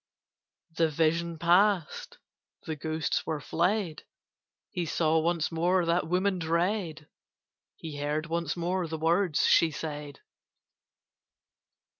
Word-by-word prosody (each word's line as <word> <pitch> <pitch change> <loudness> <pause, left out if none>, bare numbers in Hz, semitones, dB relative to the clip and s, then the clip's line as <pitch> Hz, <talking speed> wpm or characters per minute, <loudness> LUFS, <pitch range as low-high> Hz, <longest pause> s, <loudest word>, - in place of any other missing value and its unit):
The 165 -1 +2
vision 165 +2 0
passed: 175 +1 +2 0.5
the 160 - -3
ghosts 155 +1 -2
were 155 -2 -1
fled: 175 +2 -1 0.7
He 175 -3 -3
saw 160 0 +2
once 165 0 0
more 175 +2 +2
that 170 +1 +1
woman 185 +2 +1
dread: 170 -1 -1 0.7
He 155 -3 -8
heard 150 +2 -1
once 170 0 -2
more 175 +1 -1
the 160 0 -4
words 165 +1 +2
she 165 - +5
said. 145 -1 -6
165 Hz, 110 wpm, -28 LUFS, 155-175 Hz, 0.7 s, she